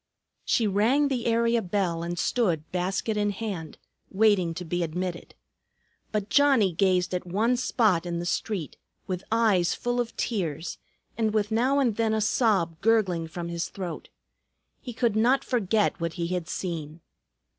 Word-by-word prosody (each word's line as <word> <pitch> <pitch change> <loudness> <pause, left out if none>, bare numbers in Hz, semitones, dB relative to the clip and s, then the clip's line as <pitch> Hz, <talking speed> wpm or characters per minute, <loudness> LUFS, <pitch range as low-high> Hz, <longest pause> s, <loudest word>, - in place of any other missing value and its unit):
She 230 - +2
rang 230 +9 +2
the 250 -4 -1
area 230 0 +2
bell 180 -3 -1
and 175 +1 -4
stood 175 -7 0
basket 190 +4 -1
in 205 0 +1
hand, 195 -6 -5 0.3
waiting 190 -5 +2
to 180 +1 -6
be 175 +2 -2
admitted. 175 +1 -4 0.8
But 210 -2 -1
Johnnie 270 -10 +4
gazed 185 +1 +2
at 180 0 -3
one 220 +7 +1
spot 215 -8 +1
in 170 -1 -2
the 170 - -3
street, 180 -2 -3 0.3
with 185 -1 -4
eyes 210 -7 +3
full 245 0 -2
of 235 -1 -6
tears, 165 - -3 0.4
and 220 -1 +1
with 210 0 +1
now 250 +5 +2
and 245 -7 +1
then 225 -1 +1
a - - +1
sob 200 -7 +1
gurgling 195 -7 +2
from 170 +1 -6
his 170 0 -3
throat. 180 -4 -6 0.7
He 250 - -7
could 235 -2 0
not 245 +5 +3
forget 215 -4 +1
what 170 -1 -2
he 170 -1 -3
had 180 -3 -3
seen. 165 -3 -5
195 Hz, 160 wpm, -26 LUFS, 175-225 Hz, 0.8 s, Johnnie